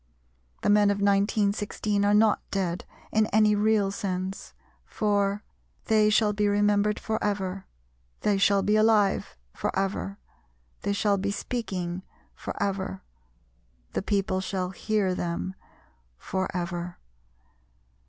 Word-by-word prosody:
The -, -, +2 dB
men 205 Hz, 0 st, +5 dB
of 205 Hz, -, +2 dB
1916 200 Hz, 0 st, +1 dB
are 205 Hz, 0 st, +3 dB
not 215 Hz, 0 st, +4 dB
dead 180 Hz, -3 st, -2 dB, 0.3 s
in 215 Hz, 0 st, +3 dB
any 215 Hz, -1 st, +4 dB
real 210 Hz, -1 st, +2 dB
sense, 190 Hz, -1 st, -4 dB, 0.3 s
for 205 Hz, 0 st, 0 dB, 0.4 s
"They 215 Hz, -1 st, +4 dB
shall 210 Hz, 0 st, +3 dB
be 205 Hz, 0 st, +1 dB
remembered 205 Hz, 0 st, +2 dB
for 220 Hz, 0 st, -2 dB
ever, 195 Hz, -2 st, -2 dB, 0.5 s
They 205 Hz, -2 st, +2 dB
shall 195 Hz, 0 st, +4 dB
be 210 Hz, -, +2 dB
alive 215 Hz, -, +3 dB, 0.2 s
for -, -, -2 dB
ever, 195 Hz, +1 st, -2 dB, 0.6 s
They 200 Hz, -, 0 dB
shall 200 Hz, -1 st, +1 dB
be 200 Hz, +1 st, -1 dB
speaking 190 Hz, -5 st, -3 dB, 0.3 s
for -, -, -6 dB
ever, 190 Hz, -, -2 dB, 0.9 s
The -, -, 0 dB
people 195 Hz, -2 st, 0 dB
shall 185 Hz, -1 st, -2 dB
hear 205 Hz, -1 st, 0 dB
them 175 Hz, +1 st, -3 dB, 0.6 s
for 190 Hz, -, -2 dB
ever." 175 Hz, -1 st, -4 dB
200 Hz, 125 wpm, -27 LUFS, 190-210 Hz, 0.9 s, men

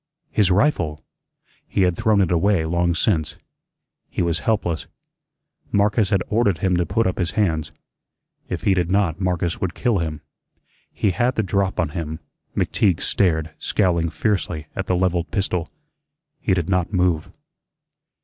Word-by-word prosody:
His 105 Hz, -4 st, +3 dB
rifle! 90 Hz, -, +2 dB, 0.7 s
He 95 Hz, -, +1 dB
had 90 Hz, -1 st, +2 dB
thrown 110 Hz, -1 st, +3 dB
it 90 Hz, -, +1 dB
away 90 Hz, 0 st, +2 dB
long 85 Hz, +1 st, +1 dB
since. 80 Hz, -5 st, 0 dB, 0.7 s
He -, -, -1 dB
was 85 Hz, -1 st, 0 dB
helpless. 90 Hz, -7 st, -1 dB, 0.8 s
Marcus 105 Hz, +1 st, +2 dB
had 95 Hz, -4 st, +2 dB
ordered 105 Hz, -5 st, +2 dB
him 90 Hz, +2 st, +1 dB
to 85 Hz, -, 0 dB
put 115 Hz, +3 st, +1 dB
up 95 Hz, -, -1 dB
his 85 Hz, -2 st, 0 dB
hands. 80 Hz, -7 st, +1 dB, 0.8 s
If -, -, -3 dB
he 100 Hz, -, +4 dB
did 90 Hz, -2 st, 0 dB
not, 95 Hz, -3 st, +1 dB
Marcus 90 Hz, -2 st, -1 dB
would 95 Hz, -1 st, -2 dB
kill 120 Hz, -6 st, +1 dB
him. 80 Hz, -2 st, -3 dB, 0.7 s
He 105 Hz, -, +1 dB
had 120 Hz, +8 st, +1 dB
the 110 Hz, -, +1 dB
drop 95 Hz, 0 st, 0 dB
on 85 Hz, -4 st, +1 dB
him. 80 Hz, 0 st, -5 dB, 0.4 s
McTeague 95 Hz, -5 st, +2 dB
stared, 80 Hz, -4 st, +1 dB
scowling 85 Hz, -5 st, +1 dB
fiercely 90 Hz, -5 st, -1 dB
at 95 Hz, -1 st, -3 dB
the 90 Hz, -, +2 dB
levelled 90 Hz, -2 st, 0 dB
pistol. 95 Hz, -5 st, -1 dB, 0.7 s
He 95 Hz, -, +1 dB
did 85 Hz, -3 st, -1 dB
not 90 Hz, -1 st, 0 dB
move. 90 Hz, -5 st, +1 dB
90 Hz, 155 wpm, -22 LUFS, 85-100 Hz, 0.8 s, he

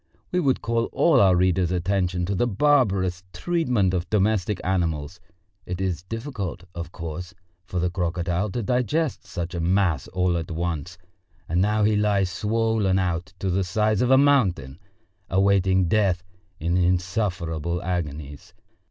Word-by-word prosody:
We 180 Hz, -, +1 dB
would 140 Hz, -6 st, +1 dB
call 115 Hz, 0 st, 0 dB, 0.3 s
our 95 Hz, -2 st, +5 dB
readers' 90 Hz, 0 st, +2 dB
attention 90 Hz, 0 st, 0 dB
to 100 Hz, -, -2 dB
the 110 Hz, +6 st, +1 dB
barbarous 100 Hz, -8 st, +2 dB
treatment 125 Hz, -, 0 dB
of 90 Hz, -1 st, -2 dB
domestic 105 Hz, -1 st, +1 dB
animals: 85 Hz, -3 st, -1 dB, 0.5 s
it 90 Hz, 0 st, -4 dB
is 90 Hz, -4 st, -1 dB
difficult, 105 Hz, -, -5 dB
of 85 Hz, 0 st, -6 dB
course, 85 Hz, +2 st, -7 dB, 0.3 s
for 90 Hz, -, -5 dB
the 90 Hz, 0 st, 0 dB
crocodile 90 Hz, +2 st, -1 dB
to 120 Hz, +4 st, -3 dB
digest 125 Hz, +7 st, -1 dB
such 85 Hz, -2 st, -5 dB
a 85 Hz, -, -3 dB
mass 85 Hz, -4 st, +1 dB
all 90 Hz, -2 st, 0 dB
at 80 Hz, -1 st, -5 dB
once, 85 Hz, 0 st, -3 dB, 0.5 s
and 85 Hz, +2 st, +1 dB
now 105 Hz, +2 st, +2 dB
he 105 Hz, +1 st, +3 dB
lies 100 Hz, -3 st, +1 dB
swollen 105 Hz, 0 st, +1 dB
out 90 Hz, 0 st, -2 dB
to 95 Hz, 0 st, -2 dB
the 95 Hz, +2 st, +1 dB
size 105 Hz, +3 st, +1 dB
of 125 Hz, -, +2 dB
a 130 Hz, -, +6 dB
mountain, 95 Hz, -, +2 dB, 0.5 s
awaiting 95 Hz, -1 st, +3 dB
death 95 Hz, -2 st, +2 dB, 0.4 s
in 85 Hz, +2 st, 0 dB
insufferable 90 Hz, -2 st, -1 dB
agonies. 75 Hz, -5 st, -5 dB
95 Hz, 145 wpm, -24 LUFS, 85-105 Hz, 0.5 s, a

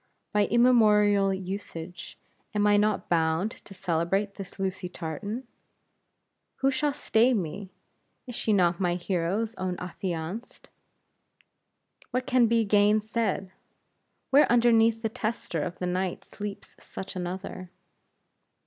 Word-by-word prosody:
By 210 Hz, -1 st, +3 dB
immemorial 210 Hz, -5 st, +4 dB
usage, 185 Hz, -3 st, -6 dB, 0.4 s
am 205 Hz, 0 st, +2 dB
I 205 Hz, 0 st, +5 dB
not 210 Hz, 0 st, +1 dB
bound 165 Hz, +4 st, +1 dB
to 195 Hz, -, -13 dB
celebrate 185 Hz, +4 st, 0 dB
this 195 Hz, -1 st, -9 dB
Lucy 190 Hz, -1 st, -3 dB
Tartan? 200 Hz, -, -5 dB, 1.1 s
Who 270 Hz, 0 st, +1 dB
shall 290 Hz, +2 st, +1 dB
stay 240 Hz, +1 st, +3 dB
me? 190 Hz, +1 st, -4 dB, 0.6 s
Is 250 Hz, -, -7 dB
she 225 Hz, -, -1 dB
not 175 Hz, -4 st, +3 dB
my 175 Hz, -2 st, +1 dB
hero's 185 Hz, +5 st, -1 dB
own 185 Hz, -1 st, -2 dB
affianced? 180 Hz, +4 st, -5 dB, 1.4 s
What 255 Hz, +1 st, -1 dB
can 255 Hz, -3 st, +4 dB
be 230 Hz, 0 st, +2 dB
gainsaid? 210 Hz, -1 st, +2 dB, 0.8 s
Where 280 Hz, -1 st, +6 dB
underneath 230 Hz, -1 st, +4 dB
the 225 Hz, -, +1 dB
tester 215 Hz, -7 st, -3 dB
of 175 Hz, +3 st, -4 dB
the 180 Hz, -, -3 dB
night 180 Hz, 0 st, -2 dB
sleeps 205 Hz, -1 st, -7 dB
such 195 Hz, +1 st, -8 dB
another? 185 Hz, 0 st, -5 dB
200 Hz, 120 wpm, -27 LUFS, 180-225 Hz, 1.4 s, Where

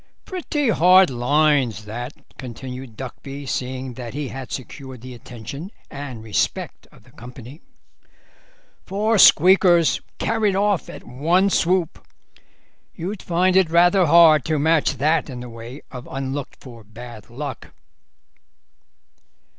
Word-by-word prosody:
"Pretty 300 Hz, -7 st, -2 dB
hard 185 Hz, -3 st, +5 dB
lines 130 Hz, -3 st, +1 dB
that," 120 Hz, +6 st, -6 dB, 0.3 s
continued 125 Hz, -1 st, -8 dB
Duckby, 135 Hz, +2 st, -8 dB
seeing 130 Hz, 0 st, -4 dB
that 120 Hz, 0 st, -8 dB
he 145 Hz, -3 st, -4 dB
had 135 Hz, -1 st, -8 dB
secured 130 Hz, -1 st, -8 dB
the 130 Hz, +1 st, -9 dB
attention 125 Hz, -, -9 dB, 0.2 s
and 135 Hz, -5 st, -7 dB
respect 110 Hz, -2 st, -2 dB
of -, -, -20 dB
the -, -, -21 dB
company; 125 Hz, +5 st, -12 dB, 1.2 s
"four 215 Hz, +2 st, 0 dB
squeakers 175 Hz, -1 st, +6 dB, 0.2 s
carried 215 Hz, -4 st, 0 dB
off 200 Hz, -1 st, 0 dB
at -, -, -10 dB
one 170 Hz, +10 st, +1 dB
swoop. 180 Hz, -2 st, 0 dB, 0.9 s
You'd 185 Hz, +3 st, -5 dB
find 180 Hz, +2 st, +1 dB
it 190 Hz, -3 st, +4 dB
rather 175 Hz, +2 st, +4 dB
hard 160 Hz, -3 st, +6 dB
to 155 Hz, -1 st, 0 dB
match 160 Hz, +1 st, +2 dB
that 155 Hz, +2 st, +1 dB
in 125 Hz, -2 st, -7 dB
the 125 Hz, 0 st, -8 dB
way 115 Hz, +4 st, -10 dB
of 125 Hz, -1 st, -9 dB
unlooked 135 Hz, +1 st, -5 dB
for 120 Hz, -4 st, -13 dB
bad 110 Hz, 0 st, -12 dB
luck." 135 Hz, +3 st, -7 dB
140 Hz, 125 wpm, -21 LUFS, 125-175 Hz, 1.2 s, squeakers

